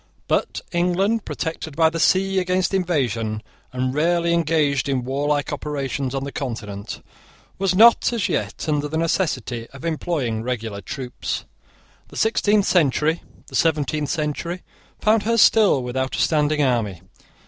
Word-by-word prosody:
But - - 0
England, 185 +5 +1
protected 160 -2 -4
by 160 0 +4
the 165 - -3
sea 190 +3 +3
against 185 0 0
invasion, 120 - 0 0.3
and 130 0 -1
rarely 170 +3 +2
engaged 150 -5 +1
in 130 -2 0
warlike 145 +2 -1
operations 140 -2 -3
on 135 - -2
the 140 - -5
Continent, 110 -7 -5 0.6
was 190 -1 +1
not, 230 +5 +6
as 230 -5 0
yet, - - -2
under 150 -1 0
the 160 +2 -3
necessity 130 - -1
of 135 +3 -9
employing 150 -8 -1
regular 115 -4 -4
troops. 125 +6 -5 0.6
The - - -11
sixteenth 210 -2 +2
century, 160 -1 +2 0.2
the - - -10
seventeenth 150 -2 +1
century, 170 +3 -3 0.4
found 215 +1 +3
her 230 +2 +1
still 210 - +5
without 130 +2 -2
a - - -3
standing 150 -1 +2
army. 110 - 0
150 Hz, 140 wpm, -22 LUFS, 130-175 Hz, 0.6 s, not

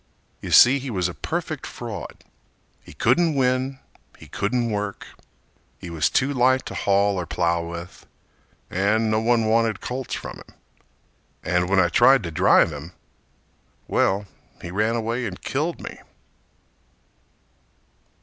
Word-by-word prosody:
You - - -6
see 130 +3 +7
he 135 0 -6
was 90 -6 0
a 90 - -6
perfect - - -4
fraud: - - -8 0.6
He - - -14
couldn't 170 -3 +2
win, 130 0 0 0.4
he - - -14
couldn't 115 +3 -1
work, 105 -1 -4 0.7
He 85 - -9
was 80 -3 +1
too 140 +2 +1
light 130 0 +2
to - - -6
haul 100 -1 +1
or 90 - -4
plow 85 -1 0
with, 85 +1 -9 0.6
And 110 +4 +1
no 110 - +2
one 115 0 +2
wanted 110 -2 +1
colts 125 +3 -4
from - - -7
him. - - -16 0.9
And 90 +1 0
when 100 -1 +3
I 85 -1 +3
tried 120 +7 +5
to 85 - -5
drive 80 +1 +4
him—well, 90 +5 -5 0.3
He 85 - -8
ran 105 +4 0
away 115 +2 -2
and - - -7
killed 155 +5 -2
me. - - -9
110 Hz, 140 wpm, -23 LUFS, 90-125 Hz, 0.9 s, see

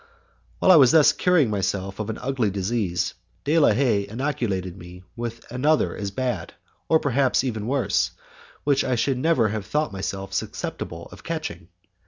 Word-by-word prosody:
While 190 - +5
I 180 - +9
was 135 -3 +6
thus 155 -3 +6
curing 170 -10 +3
myself 95 0 -2
of 110 0 -3
an 110 - -3
ugly 125 -4 -1
disease, 95 -2 -1 0.3
De 155 +3 +3
la 150 - +6
Haye 110 -7 +1
inoculated 105 -7 -2
me 90 0 -12
with 115 -1 -6
another 145 +5 +1
as 100 -1 -3
bad, 125 +5 -3 0.5
perhaps 135 -2 +2
even 110 -5 -3
worse, 125 -7 +1 0.5
which 140 -1 +2
I 130 - 0
should 130 +2 0
never 130 -7 +3
have 105 -1 -4
thought 150 -5 -1
myself 95 0 -4
susceptible 85 -2 -4
of - - -13
catching. 155 - -5
115 Hz, 160 wpm, -24 LUFS, 100-140 Hz, 0.5 s, I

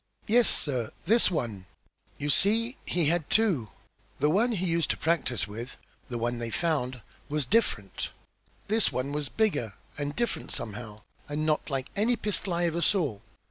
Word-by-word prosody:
"Yes, 235 +2 +6
sir! 125 -6 +1 0.2
This 225 +4 +5
one. 110 - -3 0.5
You 145 +1 0
see 230 - +3
he 175 -3 +1
had 165 0 +1
two. 185 - +2 0.5
The 150 - +3
one 230 +7 +3
he 185 -3 -1
used 170 -2 +1
to - - 0
practise 155 -9 0
with 115 +5 -7 0.3
the 120 - -3
one 120 +1 -1
they 115 -1 -3
found 130 -4 -1 0.3
was 150 -1 0
different. 125 - 0 0.6
This 220 +1 +3
one 130 +2 -2
was 145 -1 -2
bigger 145 - 0 0.2
and 145 0 -2
different 235 0 -2
somehow, 110 -1 -4 0.3
and 150 +1 -1
not 155 0 +1
like 135 -2 -3
any 225 +5 +3
pistol 200 -4 -1
I 175 0 +1
ever 170 0 0
saw. 155 - +2
150 Hz, 165 wpm, -28 LUFS, 125-195 Hz, 0.6 s, Yes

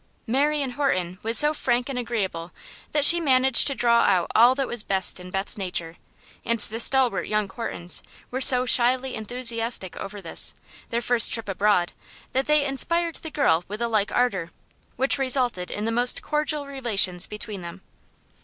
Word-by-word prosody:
Marion 280 +2 -1
Horton 185 -10 -2
was 225 +1 +2
so 300 0 +5
frank 245 -4 -1
and 270 -3 -4
agreeable 190 -8 -4 0.4
that 295 -1 +3
she 345 +3 +8
managed 265 -4 +3
to 275 - +1
draw 235 -1 +2
out 175 -2 +1
all 240 +3 +5
that 270 -1 -2
was 240 -2 0
best 190 -3 -1
in 180 0 -11
Beth's 195 +3 -3
nature, 175 -3 -4 0.5
and 235 0 -2
the 220 +2 -2
stalwart 260 0 +2
young 215 -1 -1
Hortons 190 -4 -3 0.3
were 260 +2 -4
so 250 -1 +6
shyly 255 +1 +2
enthusiastic 230 -3 -2
over 205 +1 -8
this, 170 -4 -2 0.3
their 235 +1 -3
first 240 -1 +5
trip 225 -2 -2
abroad, 195 -2 0 0.4
that 265 +1 -2
they 300 -1 +2
inspired 335 +5 -1
the 320 - -8
girl 175 - +1
with 210 +2 -7
a 235 - -1
like 215 -3 -1
ardor, 195 -9 -1 0.5
which 265 +2 +1
resulted 250 -8 0
in 210 - -5
the 225 - -1
most 245 +2 +3
cordial 300 -1 -2
relations 220 -10 0
between 210 -2 -7
them. 170 +2 -10
235 Hz, 175 wpm, -23 LUFS, 195-265 Hz, 0.5 s, she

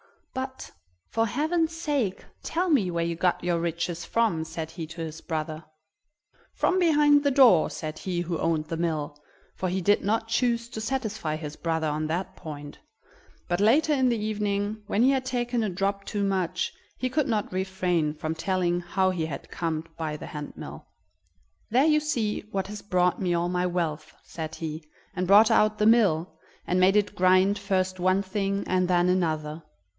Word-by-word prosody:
"But, 260 0 -5 0.4
for 225 0 +1
heaven's 320 +7 0
sake, 285 - -1 0.2
tell 355 +3 -1
me 240 - +3
where 170 -1 -1
you 170 0 -2
got 175 +1 0
your 175 -1 +1
riches 170 0 -2
from," 215 -9 +1
said 160 0 -6
he 165 -1 -6
to 165 +1 -8
his 160 0 -5
brother. 155 -1 -4 0.9
"From 370 - +1
behind 295 -4 +5
the 285 - +3
door," 255 - +6
said 155 -1 -6
he 180 -2 -2
who 175 -1 -3
owned 160 -2 0
the 165 - -4
mill, 155 -3 -2 0.3
for 185 - -2
he 190 +1 -1
did 205 +4 +3
not 225 +2 0
choose 235 0 +1
to 220 - -6
satisfy 220 - -2
his 155 -1 -6
brother 160 -1 -1
on 155 +1 -1
that 185 +4 -3
point; 145 -3 -9 0.7
but 175 +1 0
later 275 +9 +4
in 260 -3 +3
the 235 - +1
evening, 210 0 -2
when 215 - +2
he 265 - +5
had 265 -1 0
taken 245 -2 -1
a 215 - 0
drop 195 +2 -2
too 205 -2 -2
much, 185 -2 -1 0.2
he 255 - -1
could 295 +2 0
not 215 -5 -1
refrain 185 -4 0
from 155 +1 -3
telling 175 +1 0
how 190 +1 +1
he 170 -3 -2
had 140 -4 -7
come 160 -2 -2
by 155 -2 -3
the - - -8
hand 150 -3 -7
mill. - - -9 0.8
"There 255 +6 +4
you 305 -1 +4
see 235 -9 -1
what 195 -2 -2
has 210 0 -7
brought 180 -2 +1
me 175 -2 +1
all 170 +1 0
my 180 0 0
wealth!" 165 -4 -3
said 160 -1 -6
he, 160 -1 -5 0.3
and 180 0 -2
brought 210 +4 +7
out 215 -1 +3
the 210 - +2
mill, 185 -8 +3 0.3
and 180 - +1
made 185 +2 +5
it 205 0 +2
grind 185 +2 +4
first 185 -2 -1
one 185 +2 +2
thing 200 0 -1
and 185 0 +1
then 175 -1 +3
another. 155 -3 0
185 Hz, 185 wpm, -26 LUFS, 165-220 Hz, 0.9 s, brought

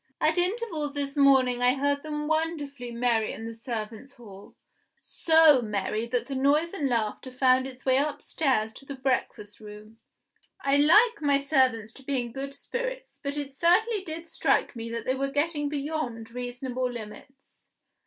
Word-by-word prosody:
At 315 +3 +2
intervals 355 -6 -2
this 280 0 -3
morning 265 -3 +4
I 250 +1 +4
heard 285 +1 0
them 300 -1 -4
wonderfully 300 -5 -2
merry 235 -2 0
in 225 - -7
the 230 - -6
servants 230 +2 -6
hall 205 -6 -14 0.4
so 320 -5 +5
merry 215 +1 -2
that 245 0 -1
the 275 - -6
noise 290 +6 +2
and 290 -8 -1
laughter 230 +2 -2
found 255 0 +3
its 260 -1 -12
way 260 -1 +4
upstairs 275 -5 0
to 275 - -14
the 280 - -6
breakfast 255 -6 -2
room. 215 +1 -12 0.6
I 275 -4 +2
like 420 +11 +5
my 285 -2 +3
servants 260 -6 +1
to 270 - -14
be 270 0 -1
in 240 -1 -4
good 275 +3 -6
spirits; - - -5
but 280 0 -4
it 280 -2 -4
certainly 375 +7 +2
did 330 -1 -7
strike - - 0
me 230 0 -6
that 230 -1 -5
they 260 - +1
were 275 +1 -2
getting 295 +1 -1
beyond 280 -6 -4
reasonable 250 +1 -4
limits. 240 +4 -11
270 Hz, 165 wpm, -27 LUFS, 240-300 Hz, 0.6 s, so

